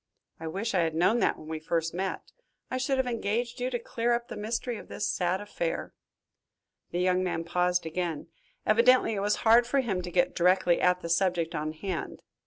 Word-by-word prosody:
I 160 Hz, -, -5 dB
wish 200 Hz, +8 st, -3 dB
I 185 Hz, -, +3 dB
had 160 Hz, -2 st, 0 dB
known 185 Hz, +8 st, +3 dB
that -, -, +2 dB
when 155 Hz, -, -12 dB
we 160 Hz, 0 st, -4 dB
first 165 Hz, +1 st, -1 dB
met 190 Hz, +2 st, -4 dB, 0.4 s
I 255 Hz, -, -1 dB
should 265 Hz, +1 st, 0 dB
have 265 Hz, -, +1 dB
engaged 235 Hz, +1 st, -2 dB
you 250 Hz, -, 0 dB
to 245 Hz, -, -1 dB
clear 235 Hz, 0 st, -1 dB
up 235 Hz, 0 st, -2 dB
the -, -, -6 dB
mystery 230 Hz, +2 st, -3 dB
of -, -, -11 dB
this 205 Hz, -, -3 dB
sad 180 Hz, -1 st, 0 dB
affair." 175 Hz, -5 st, -3 dB, 1.0 s
The 175 Hz, -, -2 dB
young 185 Hz, 0 st, +2 dB
man 175 Hz, -2 st, -2 dB
paused 180 Hz, +1 st, +1 dB
again. 165 Hz, -1 st, -3 dB, 0.4 s
Evidently 235 Hz, +2 st, +5 dB
it 205 Hz, -, -2 dB
was 205 Hz, +1 st, +1 dB
hard 230 Hz, +2 st, +7 dB
work -, -, -11 dB
for 275 Hz, -, +2 dB
him 200 Hz, -7 st, -2 dB
to 180 Hz, -, -6 dB
get 175 Hz, 0 st, +2 dB
directly 180 Hz, 0 st, +3 dB
at 180 Hz, 0 st, +3 dB
the 170 Hz, -, -5 dB
subject 170 Hz, -1 st, +1 dB
on 155 Hz, +1 st, -2 dB
hand. 170 Hz, -1 st, -5 dB
185 Hz, 210 wpm, -28 LUFS, 170-230 Hz, 1.0 s, hard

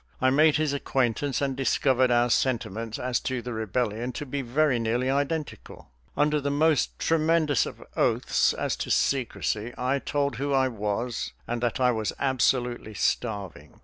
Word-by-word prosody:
I 130 Hz, 0 st, +3 dB
made 155 Hz, +2 st, +5 dB
his 155 Hz, -2 st, +1 dB
acquaintance 135 Hz, 0 st, 0 dB
and 135 Hz, -1 st, -1 dB
discovered 130 Hz, -1 st, +2 dB
our 120 Hz, 0 st, +3 dB
sentiments 115 Hz, -3 st, -1 dB
as 125 Hz, -1 st, -1 dB
to 130 Hz, -1 st, -3 dB
the 125 Hz, -, -5 dB
rebellion 110 Hz, +2 st, -2 dB
to 150 Hz, -, -5 dB
be 140 Hz, +1 st, -3 dB
very 130 Hz, +1 st, +1 dB
nearly 120 Hz, +3 st, 0 dB
identical. 145 Hz, -, -3 dB, 0.3 s
Under 150 Hz, 0 st, +2 dB
the 140 Hz, -, -1 dB
most 150 Hz, +1 st, +2 dB
tremendous 160 Hz, -4 st, +2 dB
of -, -, -9 dB
oaths -, -, +2 dB
as -, -, -2 dB
to -, -, -4 dB
secrecy, 120 Hz, -3 st, 0 dB
I 130 Hz, +2 st, 0 dB
told 140 Hz, 0 st, -1 dB
who 140 Hz, +2 st, -1 dB
I 130 Hz, -1 st, +3 dB
was 110 Hz, +1 st, -3 dB
and 120 Hz, 0 st, -3 dB
that 120 Hz, +2 st, -1 dB
I 125 Hz, -1 st, +4 dB
was 110 Hz, -3 st, -2 dB
absolutely 125 Hz, -4 st, 0 dB
starving. 100 Hz, -4 st, -3 dB
130 Hz, 160 wpm, -26 LUFS, 120-140 Hz, 0.3 s, made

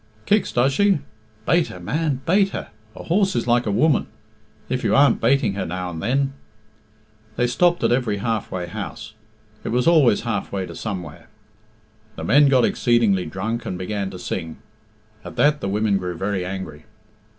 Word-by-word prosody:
"Kicks, 210 Hz, -1 st, +2 dB
does 130 Hz, +3 st, +2 dB
she? 200 Hz, +5 st, +3 dB, 0.5 s
Bate 170 Hz, -1 st, +3 dB
her, 90 Hz, -, -9 dB
man; 135 Hz, -, -1 dB
bate 195 Hz, +3 st, +3 dB
her. -, -, -6 dB, 0.3 s
A -, -, -9 dB
horse 190 Hz, +3 st, +1 dB
is 120 Hz, -, 0 dB
like 120 Hz, -1 st, +2 dB
a -, -, +1 dB
woman. 150 Hz, +8 st, +2 dB, 0.6 s
If -, -, -2 dB
you -, -, +2 dB
aren't 140 Hz, +1 st, +4 dB
bating 130 Hz, -2 st, +2 dB
her 100 Hz, -, -3 dB
now 90 Hz, +1 st, -4 dB
and 80 Hz, -1 st, -6 dB
then 135 Hz, +5 st, 0 dB, 0.5 s
" 110 Hz, 0 st, -34 dB
They 125 Hz, -, +2 dB
stopped 175 Hz, +8 st, +2 dB
at -, -, +3 dB
every 120 Hz, -4 st, +1 dB
half 110 Hz, +1 st, -2 dB
way 90 Hz, -1 st, -3 dB
houses 85 Hz, +4 st, -7 dB, 0.5 s
it -, -, -4 dB
was 125 Hz, +2 st, +1 dB
always 155 Hz, -10 st, +4 dB
halfway 105 Hz, -4 st, -3 dB
to -, -, -9 dB
somewhere. 90 Hz, -8 st, -6 dB, 0.9 s
The -, -, -7 dB
men 145 Hz, +1 st, +5 dB
got 130 Hz, -3 st, +4 dB
exceedingly 115 Hz, -7 st, +2 dB
drunk 110 Hz, +5 st, -3 dB
and 90 Hz, -, -3 dB
began 100 Hz, +1 st, -3 dB
to 95 Hz, -, -8 dB
sing. 80 Hz, -3 st, -5 dB, 0.7 s
At -, -, -9 dB
that 145 Hz, 0 st, +3 dB
the 95 Hz, -, -2 dB
women 105 Hz, 0 st, +1 dB
grew 90 Hz, -2 st, -4 dB
very 95 Hz, 0 st, -2 dB
angry. 90 Hz, -5 st, -6 dB
110 Hz, 180 wpm, -22 LUFS, 95-140 Hz, 0.9 s, men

